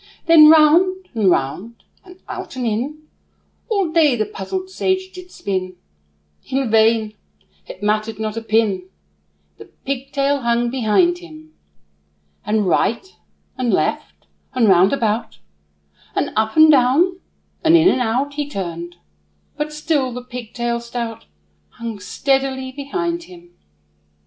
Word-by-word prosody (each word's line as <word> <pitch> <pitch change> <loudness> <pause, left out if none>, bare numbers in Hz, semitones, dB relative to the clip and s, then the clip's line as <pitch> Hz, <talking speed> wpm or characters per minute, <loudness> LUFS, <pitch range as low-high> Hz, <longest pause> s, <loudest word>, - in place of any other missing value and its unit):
Then 320 -2 +8
round, 355 +4 +4
and 215 -5 +2
round, 180 +11 -2 0.2
and 365 0 -16
out - - -7
and 255 -1 -3
in, 260 +8 -3 0.7
All 395 -7 0
day 315 -5 +4
the 215 -2 -1
puzzled 370 - -6
sage 375 0 -1
did 365 -1 -11
spin; 185 - -4 0.7
In 265 -3 -1
vain 220 -1 +3 0.5
it 185 - -10
mattered 215 +1 0
not 215 0 -4
a 230 - -3
pin, 215 -4 0 0.7
The - - -10
pigtail 275 +1 -2
hung 235 0 0
behind 265 - +2
him. 315 -3 -14 0.9
And 210 -1 0
right, 230 - 0 0.4
and 245 -2 0
left, - - -2 0.3
and 240 -3 +3
round 190 0 +5
about, 225 - -1 0.8
And - - -1
up, 220 0 0
and 315 0 +8
down, 295 +8 +3 0.4
and 330 +1 +6
in, 330 +2 +4
and 260 - +3
out, 250 +5 -1
He 290 0 -4
turned; 175 - -6 0.6
but 300 0 -3
still 300 -4 -1
the 250 +1 -7
pigtail 240 -1 -4
stout 235 -1 -6 0.5
Hung 230 -3 -7
steadily 265 +5 -1
behind 340 +5 -3
him. 175 -1 -15
250 Hz, 130 wpm, -19 LUFS, 220-310 Hz, 0.9 s, Then